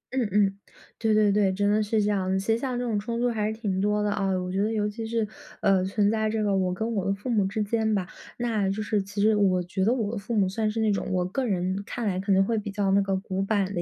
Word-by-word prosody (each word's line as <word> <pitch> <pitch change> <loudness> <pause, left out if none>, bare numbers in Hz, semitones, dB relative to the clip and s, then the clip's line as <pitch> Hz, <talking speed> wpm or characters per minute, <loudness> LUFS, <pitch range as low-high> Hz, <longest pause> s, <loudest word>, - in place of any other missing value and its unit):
嗯， 250 -4 +1
嗯， 200 -1 +2 0.4
对 220 -1 +1
对 210 -1 +4
对， 200 -1 +3
真 205 +2 0
的 215 +1 +3
是 215 +1 0
这 - - 0
样， 190 -1 0
其 195 +4 +1
实 - - +1
像 255 -1 -2
这 245 - -2
种 215 -3 0
冲 230 +3 -3
突 245 +1 +2
还 215 -2 -1
是 220 - -2
挺 200 -4 -2
多 210 0 +1
的 210 - +1
啊， 200 -1 0
我 180 0 -4
觉 190 +1 0
得 215 +2 +1
尤 210 -2 0
其 220 +2 -5
是， 225 -1 -1 0.3
呃， 195 -2 +3
存 200 +2 +1
在 220 -1 0
这 215 0 -1
个 200 -2 +1
我 185 -1 +1
跟 220 +5 -2
我 200 -4 -1
的 - - +2
父 205 +5 -5
母 210 -3 +3
之 210 +2 -1
间 220 0 0
吧。 185 -3 -1 0.3
那 225 -5 0
就 205 +2 -2
是 210 -1 0
其 200 +1 -7
实 215 0 +4
我 185 -3 +2
觉 190 +2 -2
得 215 - +3
我 225 -5 0
的 230 - -4
父 215 +4 -4
母 195 -3 +3
算 215 +3 -1
是 220 +1 -3
那 215 - +2
种 200 - -1
我 180 -1 +1
个 250 +8 -2
人 185 -1 -1
看 240 -2 -4
来 185 -2 0
可 195 +1 -2
能 195 0 +4
会 225 +1 0
比 210 - -6
较 200 -1 0
那 200 +1 +4
个 195 -1 0
古 190 -1 -3
板 195 -1 0
的 175 - -1
205 Hz, 320 characters per minute, -26 LUFS, 195-220 Hz, 0.4 s, 对